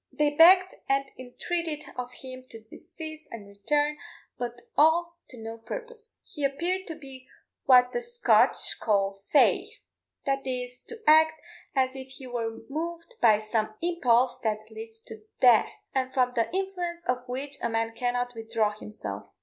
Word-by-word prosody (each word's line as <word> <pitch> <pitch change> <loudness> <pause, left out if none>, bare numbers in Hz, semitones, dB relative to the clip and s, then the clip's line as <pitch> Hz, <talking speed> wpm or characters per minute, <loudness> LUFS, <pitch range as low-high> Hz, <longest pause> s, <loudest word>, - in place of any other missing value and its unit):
They 300 -1 +1
begged 365 +4 +7 0.2
and 275 0 +2
entreated 305 +5 -4
of 250 0 -5
him 255 -1 -8
to 225 - -10
desist 310 +7 -10
and 215 -3 -9
return, 290 +9 0 0.4
but 240 0 -6
all 340 +3 +3
to 250 - -9
no 225 0 -7
purpose: 465 - -8
he 295 -5 -7
appeared 345 +7 -1
to 325 - -5
be 270 -4 -12 0.4
what 250 -1 +6
the 485 - -2
Scotch 475 0 +3
call 200 -2 +1 0.2
fey 300 - +4 0.6
that 275 -1 -1
is, 250 -1 -4
to 455 -1 -9
act 315 +1 +6 0.4
as 260 0 +1
if 265 0 -8
he 260 - -10
were 230 -2 -4
moved 335 - -5
by 215 -2 +6
some 215 0 -2
impulse 255 -7 +2
that 215 -1 -3
leads 225 0 -10
to 220 -1 -11 0.2
death, 245 -4 +6 0.2
and 260 -1 0
from 250 -1 +1
the 230 -2 0
influence 360 -2 -3
of 250 0 0
which 270 +3 -5
a 235 - 0
man 225 0 -1
cannot 245 +1 -1
withdraw 225 -2 -1
himself. 210 0 -7
260 Hz, 160 wpm, -27 LUFS, 230-320 Hz, 0.6 s, begged